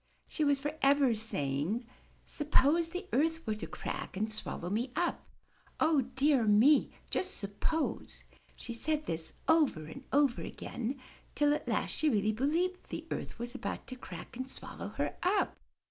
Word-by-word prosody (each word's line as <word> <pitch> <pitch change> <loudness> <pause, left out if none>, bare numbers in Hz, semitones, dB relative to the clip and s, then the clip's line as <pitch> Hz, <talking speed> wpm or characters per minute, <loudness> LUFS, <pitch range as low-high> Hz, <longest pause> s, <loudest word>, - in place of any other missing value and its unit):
She 310 - -1
was 285 -1 +4
forever 280 -2 +3
say 145 -11 -1
ing, 215 - -1 0.4
''Suppose 300 +2 +3
the 365 +3 -5
earth 325 +4 +2
were 220 - 0
to 215 - -5
crack - - -5
and 215 +2 -1
swallow 180 -4 -4
me 235 +5 0
up! 350 - -1 0.5
O 315 -3 +4
dear 270 -3 +4
me! 230 +9 +6 0.2
Just 375 0 0
suppose 215 +10 -2 0.2
!'' - - -34
She 235 - -6
said 305 +6 -1
this 160 0 -2
over 300 - +3
and 155 - -9
over 280 -3 +3
again 250 +3 -4 0.4
till 290 0 +4
at 300 - -3
last - - 0
she 310 - +3
really 215 -4 +2
believed 330 - 0
the - - -5
earth - - -4
was 240 +1 -5
about 265 - -4
to 255 - -7
crack 180 -8 -9
ajid 255 +2 -5
swallow - - -6
her - - -3
up. 390 +3 +2
270 Hz, 165 wpm, -32 LUFS, 220-310 Hz, 0.5 s, me